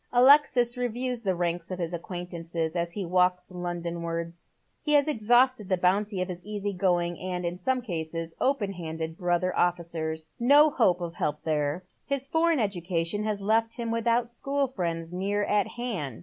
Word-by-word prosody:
Alexis 250 Hz, -2 st, +5 dB
reviews 245 Hz, 0 st, -1 dB
the 190 Hz, -4 st, 0 dB
ranks 175 Hz, 0 st, -2 dB
of 185 Hz, -, -4 dB
his 175 Hz, -1 st, -3 dB
acquaintances 170 Hz, -2 st, -4 dB
as 170 Hz, 0 st, -1 dB
he 200 Hz, -3 st, -3 dB
walks 180 Hz, +1 st, +1 dB
Londonwai'ds. 170 Hz, -1 st, -4 dB, 0.4 s
He 300 Hz, -, +1 dB
has 290 Hz, 0 st, +5 dB
exhausted 240 Hz, -3 st, +3 dB
the 185 Hz, -, +2 dB
bounty 190 Hz, +2 st, +1 dB
of -, -, -6 dB
his 180 Hz, -1 st, -7 dB
easy 205 Hz, -1 st, -3 dB
going, 175 Hz, -2 st, 0 dB
and, 180 Hz, -1 st, -3 dB
in 175 Hz, +1 st, -3 dB
some 255 Hz, +6 st, 0 dB
cases, 165 Hz, -4 st, -4 dB
open 235 Hz, -8 st, +1 dB
handed 160 Hz, -2 st, -5 dB
brother 175 Hz, +1 st, 0 dB
ofiicers. 165 Hz, -2 st, -1 dB
No 290 Hz, +5 st, +6 dB
hope 185 Hz, -10 st, +2 dB
or 170 Hz, -1 st, -3 dB
help 150 Hz, -3 st, -3 dB
there. 150 Hz, +2 st, -1 dB, 0.2 s
His 275 Hz, -1 st, -2 dB
foreign 330 Hz, +1 st, +2 dB
education 185 Hz, -3 st, -1 dB
has 210 Hz, -2 st, -2 dB
left 225 Hz, +2 st, +2 dB
him 235 Hz, -2 st, -3 dB
without 230 Hz, +1 st, +1 dB
school 275 Hz, +4 st, -1 dB
friends 170 Hz, -8 st, -3 dB
near 200 Hz, +3 st, 0 dB
at 205 Hz, -1 st, +1 dB
hand. 200 Hz, -, -4 dB
185 Hz, 165 wpm, -27 LUFS, 170-230 Hz, 0.4 s, No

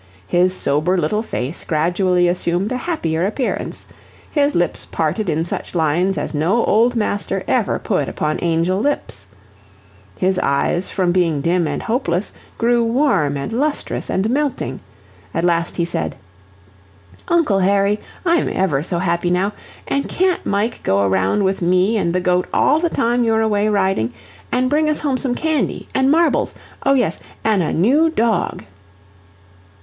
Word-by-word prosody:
His 180 Hz, -, +2 dB
sober 155 Hz, +4 st, +1 dB
little 180 Hz, +6 st, 0 dB
face 145 Hz, -, -4 dB
gradually 175 Hz, +3 st, +1 dB
assumed 175 Hz, +3 st, 0 dB
a -, -, 0 dB
happier 175 Hz, -, -2 dB
appearance; 225 Hz, +6 st, -2 dB, 0.5 s
his 290 Hz, -1 st, +1 dB
lips 175 Hz, -, 0 dB
parted 170 Hz, +5 st, -2 dB
in 160 Hz, +1 st, 0 dB
such 175 Hz, -, -5 dB
lines 170 Hz, +4 st, +1 dB
as -, -, -3 dB
no 170 Hz, +10 st, +1 dB
old 235 Hz, +3 st, +3 dB
master 205 Hz, -3 st, -1 dB
ever 230 Hz, -6 st, +1 dB
put 185 Hz, -10 st, -1 dB
upon 155 Hz, 0 st, -2 dB
angel 170 Hz, +2 st, +1 dB
lips; 210 Hz, -, -2 dB, 0.9 s
his 185 Hz, 0 st, +1 dB
eyes 175 Hz, +5 st, 0 dB
from 180 Hz, -2 st, 0 dB
being 170 Hz, -4 st, +1 dB
dim 170 Hz, +1 st, +1 dB
and 145 Hz, -, -3 dB
hopeless, 210 Hz, -6 st, -1 dB, 0.2 s
grew 235 Hz, 0 st, +2 dB
warm 230 Hz, -, +1 dB
and 140 Hz, +9 st, -4 dB
lustrous 290 Hz, +5 st, -1 dB
and 190 Hz, +3 st, 0 dB
melting. 265 Hz, -, -1 dB, 0.6 s
At 165 Hz, -, 0 dB
last 170 Hz, -1 st, +1 dB
he 170 Hz, -, 0 dB
said: 170 Hz, -1 st, -3 dB, 1.1 s
"Uncle 315 Hz, -13 st, +2 dB
Harry, 200 Hz, +2 st, +2 dB, 0.3 s
I'm 340 Hz, 0 st, +2 dB
EVER 160 Hz, -8 st, 0 dB
so 175 Hz, +2 st, -3 dB
happy 170 Hz, 0 st, 0 dB
now. 185 Hz, +4 st, +1 dB, 0.3 s
An' 280 Hz, -, 0 dB
can't 370 Hz, 0 st, 0 dB
Mike 205 Hz, +4 st, -1 dB
go 100 Hz, +1 st, +1 dB
around 95 Hz, -, +1 dB
with 190 Hz, 0 st, 0 dB
me 185 Hz, +5 st, +2 dB
and 185 Hz, -5 st, +1 dB
the 185 Hz, -, +1 dB
goat 180 Hz, 0 st, +1 dB
all 305 Hz, -, +3 dB
the 340 Hz, 0 st, +1 dB
time 240 Hz, -2 st, +1 dB
you're 225 Hz, -1 st, +2 dB
away 210 Hz, -1 st, +1 dB
riding? 190 Hz, -, +1 dB, 0.4 s
An' 250 Hz, +1 st, +1 dB
bring 305 Hz, +3 st, +2 dB
us 305 Hz, -, -1 dB
home 275 Hz, -4 st, 0 dB
some 255 Hz, -2 st, -1 dB
candy, 315 Hz, -1 st, -1 dB
an' 265 Hz, 0 st, +2 dB
marbles 330 Hz, +3 st, +2 dB, 0.3 s
oh, 275 Hz, -, +3 dB
yes 255 Hz, -, 0 dB, 0.2 s
an' 215 Hz, -4 st, +2 dB
a 160 Hz, -, -1 dB
new 280 Hz, -, +3 dB
dog." 230 Hz, -, 0 dB
190 Hz, 155 wpm, -19 LUFS, 170-240 Hz, 1.1 s, old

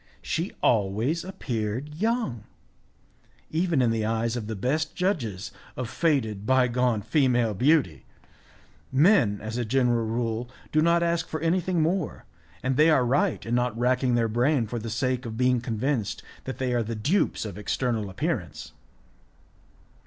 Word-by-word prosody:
She 170 Hz, +5 st, -2 dB
always 115 Hz, -, +1 dB
appeared 125 Hz, -, -4 dB
young, 205 Hz, -, -1 dB, 1.1 s
even 165 Hz, -4 st, +1 dB
in 115 Hz, -, +3 dB
the 115 Hz, -1 st, 0 dB
eyes 115 Hz, +1 st, 0 dB
of 115 Hz, -3 st, -4 dB
the 110 Hz, -, -3 dB
best 150 Hz, +10 st, -1 dB
judges 120 Hz, -, -2 dB, 0.3 s
of 125 Hz, -3 st, -4 dB
faded, 120 Hz, -11 st, 0 dB
bygone 125 Hz, -2 st, +2 dB
female 120 Hz, -6 st, +2 dB
beauty. 125 Hz, -, +2 dB, 0.8 s
Men, 135 Hz, -, +4 dB
as 110 Hz, +3 st, -4 dB
a -, -, 0 dB
general 120 Hz, -1 st, +1 dB
rule, 115 Hz, +1 st, -2 dB, 0.2 s
do 155 Hz, -, +3 dB
not 170 Hz, +1 st, +3 dB
ask 170 Hz, -1 st, 0 dB
for 155 Hz, -, -4 dB
anything 175 Hz, 0 st, +1 dB
more, 175 Hz, 0 st, -1 dB, 0.4 s
and 130 Hz, 0 st, 0 dB
they 155 Hz, +2 st, +6 dB
are 130 Hz, -6 st, +4 dB
right 145 Hz, +8 st, +1 dB
in 115 Hz, -, -3 dB
not 125 Hz, -2 st, 0 dB
racking 125 Hz, +1 st, +2 dB
their 115 Hz, -1 st, +2 dB
brain 120 Hz, +3 st, +2 dB
for 120 Hz, +2 st, -4 dB
the 115 Hz, +1 st, -5 dB
sake 125 Hz, +3 st, -1 dB
of 110 Hz, -1 st, -6 dB
being 125 Hz, -1 st, +2 dB
convinced 115 Hz, 0 st, -2 dB, 0.2 s
that 130 Hz, -, -5 dB
they 130 Hz, -1 st, -1 dB
are 120 Hz, -, +2 dB
the 115 Hz, +1 st, -3 dB
dupes 140 Hz, -, 0 dB
of 100 Hz, -4 st, -6 dB
external 110 Hz, 0 st, -1 dB
appearance. 95 Hz, -, -3 dB
125 Hz, 155 wpm, -26 LUFS, 110-155 Hz, 1.1 s, they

